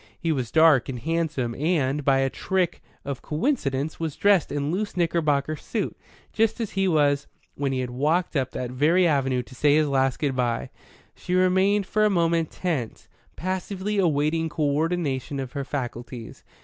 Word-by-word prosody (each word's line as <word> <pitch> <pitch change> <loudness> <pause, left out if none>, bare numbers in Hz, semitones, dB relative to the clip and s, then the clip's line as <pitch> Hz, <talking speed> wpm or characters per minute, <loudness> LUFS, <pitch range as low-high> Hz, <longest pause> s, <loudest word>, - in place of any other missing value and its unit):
He 165 - 0
was 130 -6 -1
dark 155 -3 +5
and 130 - -3
handsome, 155 -3 -1
and, 150 -1 0
by 135 -1 +3
a 135 - +1
trick 185 -2 -1 0.2
of 140 -2 -4
coincidence, 150 - -1
was 160 -3 -3
dressed 200 -5 +3
in 145 +1 -1
loose 205 +1 -3
knickerbocker 155 -4 +1
suit, - - -3 0.4
just 225 +2 +1
as 225 -3 -3
he 195 -1 +1
was 145 -4 +2 0.3
when 140 -1 -2
he 130 -1 -1
had 125 -1 -4
walked 155 +8 0
up 130 -3 +1
that 125 -1 -5
very 160 +8 +3
avenue 135 -5 +1
to 130 - -15
say 145 +3 +3
his 155 -1 +3
last 135 -2 +1
good 140 -4 -1
bye. 120 -2 -1 0.4
She 180 - -3
remained 190 +2 +3
for 215 +3 +1
a 215 - +5
moment 170 -3 +1
tense, 155 -11 -4 0.3
passively 190 +3 -2
awaiting 160 -1 +1
co 155 0 -2
ordination 150 -3 -1
of 130 -2 -5
her 140 - -3
faculties. 120 -3 -6
150 Hz, 175 wpm, -25 LUFS, 135-175 Hz, 0.4 s, dark